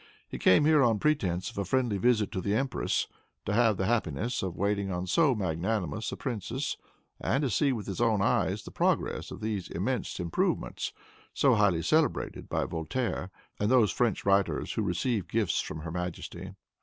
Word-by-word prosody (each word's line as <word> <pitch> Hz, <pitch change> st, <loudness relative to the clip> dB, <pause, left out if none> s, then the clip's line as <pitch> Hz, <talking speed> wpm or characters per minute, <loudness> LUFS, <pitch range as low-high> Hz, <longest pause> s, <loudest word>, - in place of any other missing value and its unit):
He -, -, -7 dB
came 95 Hz, +10 st, +5 dB
here 155 Hz, -1 st, +5 dB
on 115 Hz, -4 st, +4 dB
pretense 95 Hz, -, 0 dB
of -, -, -6 dB
a -, -, +1 dB
friendly 115 Hz, 0 st, 0 dB
visit 110 Hz, -1 st, +2 dB
to 95 Hz, -4 st, -3 dB
the 100 Hz, +3 st, 0 dB
empress; 135 Hz, +2 st, 0 dB, 0.4 s
to -, -, -1 dB
have 115 Hz, -2 st, +3 dB
the 95 Hz, -, 0 dB
happiness 115 Hz, -, 0 dB
of 95 Hz, -2 st, -4 dB
waiting 100 Hz, 0 st, 0 dB
on 90 Hz, 0 st, -2 dB
so 135 Hz, -, +3 dB
magnanimous 95 Hz, +3 st, -2 dB
a -, -, -5 dB
princess, 115 Hz, -7 st, -3 dB, 0.4 s
and 140 Hz, -, 0 dB
to 135 Hz, -, 0 dB
see, 140 Hz, +7 st, +2 dB
with 115 Hz, -5 st, -3 dB
his 100 Hz, +3 st, -4 dB
own 110 Hz, -3 st, +3 dB
eyes, 100 Hz, -, +1 dB
the -, -, -10 dB
progress -, -, 0 dB
of -, -, -9 dB
those 105 Hz, -4 st, -3 dB
immense 115 Hz, +5 st, -2 dB
improvements, 85 Hz, -2 st, -1 dB, 0.4 s
so 135 Hz, -3 st, +4 dB
highly 100 Hz, -7 st, +3 dB
celebrated 155 Hz, -1 st, 0 dB
by -, -, 0 dB
Voltaire 90 Hz, +4 st, -3 dB, 0.3 s
and 105 Hz, -, +1 dB
those 120 Hz, -5 st, +5 dB
French 120 Hz, -5 st, 0 dB
writers 100 Hz, 0 st, +2 dB
who -, -, -1 dB
receive 100 Hz, +1 st, -1 dB
gifts 105 Hz, -2 st, +1 dB
from 80 Hz, -, -6 dB
her 85 Hz, +1 st, -6 dB
majesty. 90 Hz, +2 st, -5 dB
105 Hz, 180 wpm, -29 LUFS, 90-120 Hz, 0.4 s, came